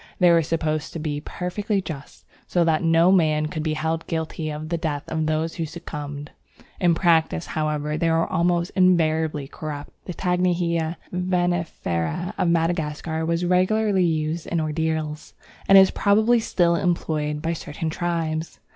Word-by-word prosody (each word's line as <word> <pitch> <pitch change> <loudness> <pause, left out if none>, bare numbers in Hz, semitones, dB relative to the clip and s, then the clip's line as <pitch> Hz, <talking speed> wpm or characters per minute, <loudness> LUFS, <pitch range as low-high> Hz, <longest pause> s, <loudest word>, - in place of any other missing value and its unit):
They 180 -2 +5
were 170 -1 +5
supposed 155 -1 -2
to 165 - -4
be 150 -2 -3
perfectly 195 +5 -2
just, 150 -7 -8 0.2
so 175 - +2
that 160 -2 +2
no 165 +2 +4
man 155 -5 +3
could 155 -2 -4
be 155 0 -1
held 160 +1 -2
guilty 160 -1 -3
of 155 +1 -5
the 170 - 0
death 150 -2 -2
of 160 -1 -1
those 155 +1 0
who 165 - -3
succumbed. 145 -3 -7 0.5
In 175 -2 +3
practice, 165 -1 +2
however, 150 -1 -2
they 165 - +2
were 165 0 +2
almost 170 0 0
invariably 160 -5 +2
corrupt. 145 0 -7
The 180 - -6
Tanghinia 175 -2 0 0.2
venenifera 175 - -1
of 175 - +1
Madagascar 160 -1 -1
was 170 +1 0
regularly 190 +2 +2
used 160 0 -1
in 170 - -1
ordeals, 155 -1 -2 0.3
and 195 - +8
is 190 0 +7
probably 220 +4 +3
still 175 -6 +2
employed 155 -4 -1
by 165 +1 0
certain 160 0 -4
tribes. 165 -1 -2
165 Hz, 155 wpm, -23 LUFS, 155-175 Hz, 0.5 s, and